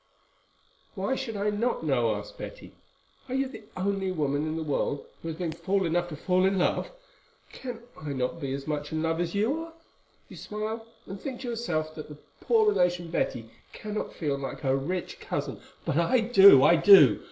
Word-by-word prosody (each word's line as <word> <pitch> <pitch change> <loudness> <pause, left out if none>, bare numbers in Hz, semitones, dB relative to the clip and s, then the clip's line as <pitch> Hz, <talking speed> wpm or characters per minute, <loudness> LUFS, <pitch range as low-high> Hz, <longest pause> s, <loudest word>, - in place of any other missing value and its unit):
"Why 200 +5 -1
should 240 -5 -4
I 205 +1 0
not 210 -4 -1
know?" 120 -7 +2
asked 105 0 -8
Betty. - - -9 0.6
"Are 255 - -2
you 270 0 +1
the 260 -5 -11
only 195 0 -1
woman 150 -3 -1
in 155 +1 -3
the 160 - -2
world 145 -1 -1 0.2
who - - -7
has 160 -1 -4
been 170 -2 -2
fool 195 +3 -1
enough 175 +1 0
to 155 - -6
fall 185 +4 +1
in 190 +1 +2
love? 180 - +1 0.6
Can 245 -3 -7
I 150 -2 -6
not 130 +4 -2
be 135 -2 -3
as 135 0 -4
much 150 -1 -3
in 160 0 -1
love 165 0 0
as 175 +2 -3
you 230 +10 +1
are? 330 0 -8 0.5
You - - -12
smile, 220 +2 -5 0.2
and 195 0 -8
think 260 -3 -6
to 250 - -4
yourself 165 -10 -2
that 155 -1 -9
the 150 - -10 0.2
poor 445 -2 +3
relation, 175 - +1
Betty, 115 -8 -2 0.2
cannot 215 0 -5
feel 145 -4 -2
like 135 - -6
her 135 -2 +1
rich 170 +7 -3
cousin. - - -4 0.3
But 140 - 0
I 235 +10 +3
do—I 190 - +7
do. 160 - +8
175 Hz, 195 wpm, -27 LUFS, 150-215 Hz, 0.6 s, do